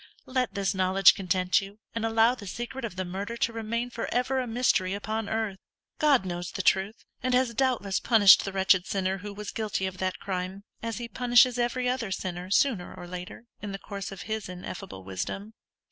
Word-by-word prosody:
Let 255 -5 -1
this 200 0 0
knowledge 190 0 +5
content 185 0 +1
you, 195 +1 -10 0.2
and 230 - -3
allow 225 +1 +4
the 215 -6 -9
secret 240 +6 -5
of 205 -6 -6
the 185 0 -3
murder 200 +6 -4
to 230 - 0
remain 230 +2 -3
for 235 - -4
ever 255 +2 +1
a 255 - -2
mystery 225 -5 +1
upon 215 +1 -3
earth, 220 -3 -2 0.4
God 280 -9 +4
knows 175 -1 -4
the 190 - -3
truth, 195 +5 +1 0.2
and 255 0 +1
has 250 -2 +2
doubtless 235 -6 +1
punished 215 -5 +7
the 195 - -4
wretched 190 -1 +3
sinner 190 0 -1
who 205 +2 -7
was 205 0 -6
guilty 215 -4 -2
of 185 -1 -5
that 185 -1 -1
crime, 190 +1 -4 0.2
as 230 -1 -3
He 240 0 -5
punishes 245 +1 +4
every 245 +1 0
other 250 -4 -1
sinner, 180 -1 -4
sooner 200 -2 +1
or 180 -1 -9
later, 180 +5 -8 0.2
in 205 -1 -5
the - - -3
course 200 +1 -6
of 195 - -7
His 220 -3 -4
ineffable 180 - -7
wisdom. 95 - -5
205 Hz, 200 wpm, -28 LUFS, 190-235 Hz, 0.4 s, punished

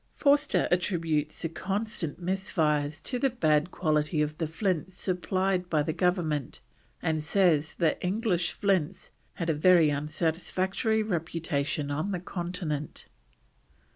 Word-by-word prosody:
Forster 290 +1 +3
attributes 165 -5 0
the 165 - -1
constant 190 -2 -3
misfires 160 -5 0
to 250 - -2
the 270 - +3
bad 155 - +2
quality 155 -2 0
of 150 0 -3
the 165 - 0
flints 180 +1 -2
supplied 185 0 -1
by 155 -3 +2
the 160 +1 -2
Government, 165 -6 0 0.4
and 160 -1 0
says 160 -2 +2
that 165 -3 +1
English 180 -3 0
flints 190 -3 -1 0.2
had 170 - -3
a 165 - +2
very 160 0 +5
unsatisfactory 175 +8 0
reputation 160 -6 -2
on 155 +8 -1
the 180 - -2
Continent. 175 -5 -4
170 Hz, 125 wpm, -28 LUFS, 155-190 Hz, 0.4 s, very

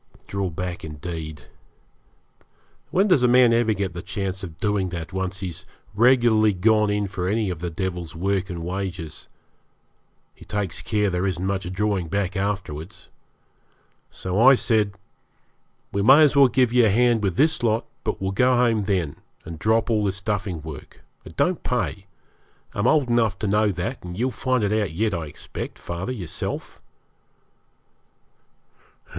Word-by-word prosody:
Draw 100 -1 -2
back, 90 +1 -5
indeed! 80 0 -6 1.5
When 195 +3 +2
does 180 -9 +4
a 125 - +4
man 125 -1 +6
ever 115 -1 +3
get 95 -2 -2
the 85 - -6
chance 95 -1 -4
of 80 -4 -8
doing 100 -2 0
that, 85 0 -6
once 95 0 -3
he's 90 -4 -5 0.3
regularly 115 -2 +4
gone 105 +3 +3
in 105 0 0
for 90 -2 -3
any 105 -1 0
of 85 - -5
the 90 +1 -3
devil's 85 -2 -4
work 95 +2 -1
and 85 -2 -5
wages? 90 -3 -5 1.1
He - - -16
takes 100 -5 -3
care 105 -2 0
there 90 +2 0
isn't 90 -1 -2
much 95 -2 -2
drawing 95 -2 -1
back 100 +3 -1
afterwards. 95 -4 -4 1.0
So 95 +3 -2
I 135 +3 +8
said 105 -5 +1 1.0
'We 100 - -1
may 135 +9 +7
as 150 -1 +4
well 140 -1 +7
give 125 -1 +2
you 120 -2 +5
a - - +3
hand 120 +2 +3
with 95 -4 -1
this 155 - +2
lot; 115 -1 +1 0.2
but - - -2
we'll 95 0 -2
go 125 +5 +3
home 115 -4 +2
then, 90 -8 -1 0.3
and 80 -1 -8
drop 110 +4 +2
all 105 -2 +2
this 100 -1 -1
duffing 95 -5 -3
work. 80 -4 -10 0.2
It 80 - -12
don't 180 -1 +1
pay. 100 - -2 0.7
I'm 100 - 0
old 145 -5 +3
enough 115 -5 +2
to 105 - -3
know 105 +1 +2
that, 95 +9 -4
and 90 0 -7
you'll 125 +4 0
find 130 -2 0
it 105 +1 +1
out 105 -6 0
yet, 105 +4 0
I 85 -3 -3
expect, 75 - -7
father, 85 +7 -5
yourself.' 95 -10 -5
100 Hz, 165 wpm, -23 LUFS, 90-115 Hz, 1.5 s, I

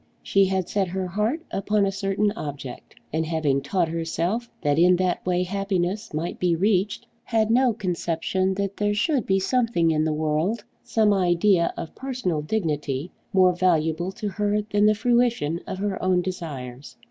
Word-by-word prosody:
She 195 0 +3
had 190 -2 -1
set 195 -1 0
her 185 +1 -3
heart 210 - -1
upon 205 +1 +1
a 195 - 0
certain 195 +1 0
object, 145 - -7 0.2
and 160 +1 +1
having 155 -4 0
taught 170 +5 0
herself 170 +8 -2
that 145 +1 +2
in 180 +1 +6
that 180 0 0
way 180 0 +2
happiness 195 +2 -2
might 160 +3 -3
be 175 -2 +2
reached, 200 +4 +1 0.2
had 220 -1 +1
no 250 +1 +4
conception 185 -1 -1
that 200 0 -3
there 205 0 +1
should 265 - +1
be 195 - +3
something 205 -5 +1
in 155 -1 +1
the 160 - +1
world, 155 +8 0 0.2
some 220 -3 +2
idea 180 -1 +3
of 160 - -6
personal 250 - -2
dignity, 150 -4 -2 0.2
more 185 -2 +5
valuable 175 -1 +1
to 210 - -4
her 205 +1 0
than 205 0 +4
the 215 - +4
fruition 235 - +1
of - - -4
her 200 0 -2
own 185 -1 +2
desires! 145 -8 -6
185 Hz, 170 wpm, -24 LUFS, 165-210 Hz, 0.2 s, in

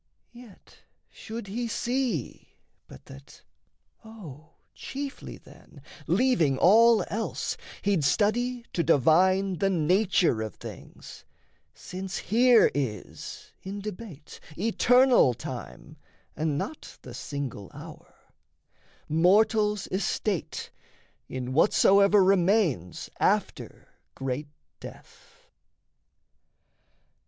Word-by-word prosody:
Yet 240 -5 -17 0.3
should 225 0 -8
he 230 +5 -4
see 240 - -3 0.3
but - - -15
that, 70 +1 -15 0.6
O 165 -9 -12 0.2
chiefly 275 0 -7
then, 145 - -18 0.3
Leaving 175 - +2
all 225 - +5
else, 225 +2 -3 0.3
he'd 200 -6 +1
study 235 - 0
to 170 - 0
divine 180 +5 +3
The 195 - +2
nature 180 - +2
of 110 -1 -5
things, - - -11 0.5
since 190 +1 -7
here 240 +2 +4
is 115 -9 -6
in 195 +2 -6
debate 195 -7 -9 0.2
Eternal 240 - +4
time - - -9 0.4
and 155 -2 -1
not 310 - -7
the - - -10
single 135 - -6
hour, - - -13 0.9
Mortal's 210 +5 +2
estate 195 -1 -3 0.6
in 130 0 -5
whatsoever 200 +5 +4
remains 185 - +1
After - - -1 0.3
great 135 +2 -4 0.3
death. - - -15
195 Hz, 90 wpm, -26 LUFS, 155-225 Hz, 0.9 s, all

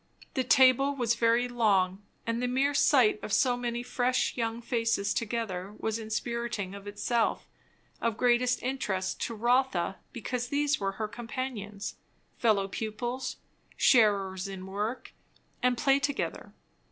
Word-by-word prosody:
The 260 - 0
table 265 +2 +5
was 240 -4 +1
very 235 +1 +2
long; 200 -6 +2 0.2
and 230 +1 -1
the 250 - 0
mere 270 +3 +1
sight 255 -7 +4
of - - -6
so 250 +3 +3
many 240 -1 -3
fresh 250 +1 0
young 230 -1 -2
faces 230 -4 0
together 210 -4 -3
was 220 0 -2
inspiriting 225 -2 -3
of 200 0 -9
itself; 225 +3 0 0.5
of 230 -2 0
greatest 250 0 +2
interest 210 -8 -2
to 230 - -6
Rotha 240 -5 +1
because 245 0 -3
these 290 +2 +1
were 195 -1 -1
her 215 +1 -3
companions, 225 -3 -5 0.4
fellow 210 -4 +3
pupils, 230 +5 -4 0.4
sharers 200 -5 +3
in 190 -1 -7
work 210 +6 -4 0.5
and 250 0 +2
play 270 +3 +3
together. 285 0 -3
235 Hz, 135 wpm, -29 LUFS, 205-250 Hz, 0.5 s, table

